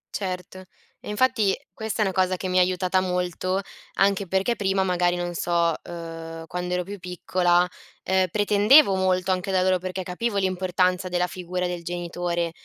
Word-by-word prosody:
Certo. 185 -1 -5 0.3
E - - -10
infatti 215 -3 +2 0.2
questa 220 -3 -2
è - - +1
una 190 - -1
cosa 185 0 +1
che 185 - -4
mi 185 0 +2
ha - - +6
aiutata 185 +1 +1
molto, 180 +1 -1 0.4
anche 200 0 +2
perché 190 +6 +1
prima 195 -2 +1
magari, 180 -1 +1
non 175 0 -3
so, 170 -1 +1
ehm, 165 -1 -7
quando 180 +2 -3
ero 180 - -1
più 200 +2 -8
piccola, 180 0 +1 0.4
ehm, 190 0 +2
pretendevo 210 - +5
molto 185 0 +1
anche 185 +1 -1
da 185 -1 +2
loro 185 0 +2
perché 185 +1 -4
capivo 200 +5 -2
l'importanza 185 -1 0
della 180 0 +1
figura 180 0 -4
del 175 -1 -4
genitore 175 0 -2
185 Hz, 170 wpm, -24 LUFS, 175-190 Hz, 0.4 s, ha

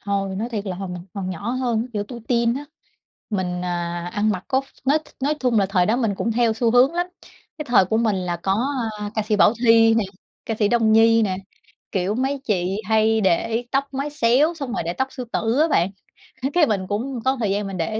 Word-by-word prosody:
hồi 195 -1 -2
nói 220 +4 -2
thiệt 215 -4 -4
là 185 -2 -3
hồi 195 0 -5
mình 180 -1 -6
còn 190 -2 -3
nhỏ 200 +5 -4
hơn 240 -2 -1
kiểu 205 -1 -2
tuổi 240 -2 -8
teen 235 -1 +2
á 280 +3 -5 0.7
mình, 180 -3 -2
à, 175 0 -3
ăn 210 +1 +1
mặc 185 -3 -3
có 265 0 +2
ph - - -14 0.2
nói 290 +4 +4 0.2
nói 290 +3 +1
thun 250 -3 +1
là 200 -2 +3
thời 185 -2 +2
đó 220 - +2
mình 225 -5 0
cũng 230 +3 -1
theo 235 -1 +2
xu 225 +1 +1
hướng 255 +6 +4
lắm, 350 0 0 0.5
cái 300 - -4
thời 240 -7 +4
của 220 +4 0
mình 220 -3 +1
là 180 -2 -2
có, 195 +8 0 0.3
à, 205 0 -4
ca 220 - 0
sĩ 210 0 0
Bảo 205 - +5
Thy 225 -1 +6
nè, 225 -2 +2 0.4
ca 225 - -1
sĩ 210 - +3
Đông 225 -1 +3
Nhi 225 +1 +5
nè, 190 -3 0 0.6
kiểu, 190 +2 0
mấy 265 +3 -1
chị 190 -3 0
hay 220 +1 +3
để 220 +5 +1
tóc 275 +1 +1
mái 275 +2 -2
xéo 290 +4 +3
xong 275 -6 -5
rồi 245 - -1
để 170 - -2
tóc 265 +7 -1
sư 255 - -6
tử 225 +3 0
á 320 - +4
bạn, 185 - +2 0.5
á, 270 - +1
cái 345 -2 +4
mình 195 -6 -1
cũng 235 +4 -3
có 265 +1 +2
thời 210 -4 0
gian 200 +1 -1
mình 195 -1 -5
để 165 - -1
220 Hz, 245 wpm, -22 LUFS, 195-245 Hz, 0.7 s, Thy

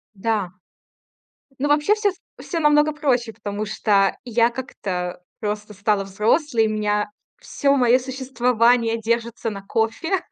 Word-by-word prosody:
Да. 205 -2 -1 1.1
Ну, 290 +2 0
вообще 295 +8 +3
всё 425 -1 +1
с 365 - -13 0.2
всё 340 - -4
намного 295 0 +4
проще, 250 -6 0
потому 210 -1 -5
что 200 -2 +2
я 235 -1 +2
как-то 185 -8 -5 0.2
просто 210 0 -4
стала 205 0 0
взрослой, 225 - +1
у - - -1
меня 210 -1 0 0.3
всё 280 0 +1
моё 250 -1 +4
существование 245 -3 +1
держится 230 0 -1
на 200 -2 -7
кофе. 225 - 0
230 Hz, 135 wpm, -22 LUFS, 210-265 Hz, 1.1 s, намного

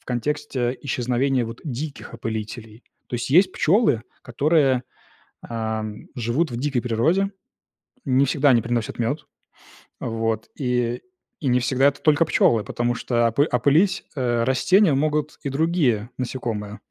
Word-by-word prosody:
в - - -31
контексте 130 -1 -2
исчезновения 125 0 0
вот 115 +1 -8
диких 140 -2 -6
опылителей. 110 0 -6 0.3
То - - -5
есть 120 - -4
есть 180 +7 +5
пчёлы, 165 - +3 0.2
которые, 135 0 +2 0.6
ам, 110 -2 -4
живут 125 +7 0
в 120 - -4
дикой 135 0 0
природе, 160 - +1 0.8
не 130 +1 +3
всегда 140 +1 +2
они 120 - +4
приносят 120 -1 -2
мёд, 140 +7 -1 0.8
вот, 115 -1 -2
и 125 -1 0 0.4
и 140 - -1
не 125 - +4
всегда 130 +2 +2
это 140 - -3
только 155 +1 +4
пчёлы, 115 -8 +3
потому 120 0 -1
что 120 0 +1
опы 130 +5 +2
опылить, 150 +10 +3
э, 120 -3 +1
растения 160 - +3
могут 150 +1 0
и 140 - -1
другие 135 -7 +1
насекомые. 115 -5 -4
125 Hz, 140 wpm, -23 LUFS, 115-145 Hz, 0.8 s, есть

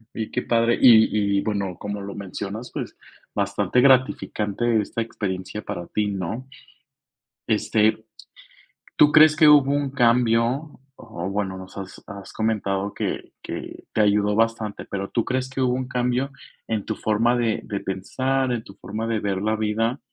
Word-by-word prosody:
Y 110 -1 -4
qué 125 - -1
padre, 115 0 +2
y 105 -4 +5
y, - - +2
bueno, 100 -5 -2
como 105 0 -5
lo 100 0 -7
mencionas, 100 +4 -6
pues, - - -6 0.4
bastante 100 +3 +1
gratificante 120 -4 +2
esta 115 - -4
experiencia 100 -2 -5
para 100 -4 -6
ti, 105 +3 -1
¿no? 100 +5 -4 1.0
Este, 110 0 +1 0.9
¿tú 150 0 +6
crees 155 0 +7
que 155 0 +6
hubo 145 -2 +6
un 145 -1 0
cambio?, 120 +3 +2 0.2
o 95 -6 -6
bueno, 95 -2 -2
nos 95 0 -11
has 95 -1 -8
has 100 -1 -9
comentado 100 -3 -1
que - - -4
que - - -7
te - - 0
ayudó 105 0 +3
bastante, 115 -2 0
pero, 100 0 -5
¿tú 115 - 0
crees 130 0 -1
que 130 - -4
hubo 125 -1 +2
un 130 0 -3
cambio 125 +2 0 0.4
en 110 -2 -1
tu 110 - -3
forma 115 +3 +1
de 115 -3 0
de 100 - -4
pensar, 130 +7 -1
en 120 -2 -2
tu 100 - -13
forma 110 +3 -5
de 115 -1 0
ver 95 -1 -2
la 110 +1 +1
vida, 110 +4 0
110 Hz, 165 wpm, -23 LUFS, 100-125 Hz, 1.0 s, crees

